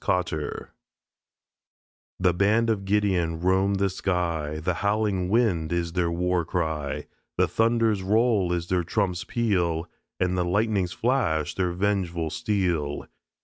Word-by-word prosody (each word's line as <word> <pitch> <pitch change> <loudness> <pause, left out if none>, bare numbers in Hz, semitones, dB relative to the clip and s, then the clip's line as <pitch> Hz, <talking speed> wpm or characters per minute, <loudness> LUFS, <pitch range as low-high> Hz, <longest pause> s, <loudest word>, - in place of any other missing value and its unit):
COTTER 85 -5 -2 1.5
The 90 -1 +3
Band 110 +5 +2
of 100 -3 -2
Gideon 95 -5 +1
roam 95 +3 +2
the 100 0 +2
sky, 85 -5 -2
The 90 +4 -1
howling 100 -3 0
wind 100 -8 +1
is 85 -1 -1
their 90 -2 +1
war 90 +1 0
cry, 80 -4 -2 0.3
The - - +3
thunder's 115 -3 +2
roll 105 -2 +2
is 85 -1 -1
their 90 -1 +1
trump's 95 0 -1
peal, 90 -7 0 0.3
And 90 0 +1
the 90 - +1
lightning's 100 0 +1
flash 110 - 0
their 90 -2 0
vengeful 90 -4 -1
steel. 90 -10 -1
90 Hz, 130 wpm, -26 LUFS, 85-105 Hz, 1.5 s, The